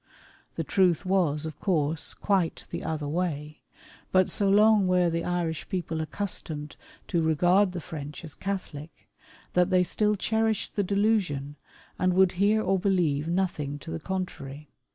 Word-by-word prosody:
The -, -, -2 dB
truth 185 Hz, -2 st, +2 dB
was, 170 Hz, -6 st, +1 dB
of 160 Hz, -, -7 dB
course, 160 Hz, -4 st, 0 dB
quite 190 Hz, -5 st, 0 dB
the -, -, -4 dB
other 155 Hz, -2 st, -3 dB
way; 150 Hz, -2 st, -3 dB, 0.5 s
but 185 Hz, -1 st, +3 dB
so 200 Hz, -1 st, +2 dB
long 210 Hz, 0 st, +5 dB
were 180 Hz, -2 st, +3 dB
the 165 Hz, 0 st, -1 dB
Irish 170 Hz, -3 st, -2 dB
people 165 Hz, -3 st, -2 dB
accustomed 155 Hz, -4 st, -4 dB, 0.3 s
to 170 Hz, -3 st, +1 dB
regard 175 Hz, +5 st, +3 dB
the 175 Hz, -, -4 dB
French 150 Hz, -1 st, -7 dB
as 155 Hz, -3 st, -8 dB
Catholic, 170 Hz, -5 st, -6 dB, 0.5 s
that 180 Hz, 0 st, +3 dB
they 185 Hz, -1 st, +4 dB
still 210 Hz, +3 st, +1 dB
cherished 220 Hz, +1 st, 0 dB
the 205 Hz, -, +2 dB
delusion, 190 Hz, -9 st, 0 dB, 0.4 s
and 185 Hz, -1 st, +2 dB
would 190 Hz, -1 st, +5 dB
hear 215 Hz, +2 st, +3 dB
or 190 Hz, 0 st, +1 dB
believe 170 Hz, -6 st, +1 dB
nothing 170 Hz, -5 st, -1 dB
to 140 Hz, -, -9 dB
the 80 Hz, -, -3 dB
contrary. 150 Hz, -6 st, -5 dB
180 Hz, 155 wpm, -27 LUFS, 155-195 Hz, 0.5 s, long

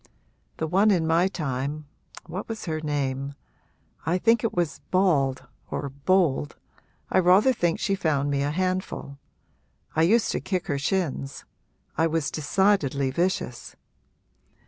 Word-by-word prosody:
The 160 Hz, -, -1 dB
one 195 Hz, +6 st, +3 dB
in 175 Hz, -5 st, +3 dB
my 165 Hz, +3 st, +3 dB
time 150 Hz, -4 st, -3 dB, 0.4 s
what 180 Hz, +6 st, -6 dB
was 220 Hz, -1 st, -5 dB
her 155 Hz, -3 st, -2 dB
name? 140 Hz, -2 st, -2 dB, 0.7 s
I 170 Hz, +4 st, +1 dB
think 230 Hz, +4 st, +3 dB
it 230 Hz, -, +1 dB
was 175 Hz, -3 st, -2 dB
Bald 150 Hz, -9 st, +2 dB, 0.2 s
or 140 Hz, -, -3 dB
Bold 145 Hz, +1 st, +1 dB, 0.6 s
I -, -, +4 dB
rather 185 Hz, +8 st, +5 dB
think 175 Hz, -7 st, 0 dB
she 195 Hz, -, 0 dB
found 145 Hz, -6 st, 0 dB
me 140 Hz, -1 st, 0 dB
a 140 Hz, -, 0 dB
handful. 185 Hz, -4 st, -2 dB, 0.8 s
I 160 Hz, -, +3 dB
used 220 Hz, +8 st, +3 dB
to -, -, -1 dB
kick 185 Hz, -3 st, -2 dB
her 140 Hz, -1 st, -1 dB
shins 140 Hz, -4 st, -2 dB, 0.5 s
I 165 Hz, -, +4 dB
was 160 Hz, -2 st, -1 dB
decidedly 150 Hz, -5 st, +1 dB
vicious. 170 Hz, -6 st, -2 dB
160 Hz, 140 wpm, -25 LUFS, 140-185 Hz, 0.8 s, rather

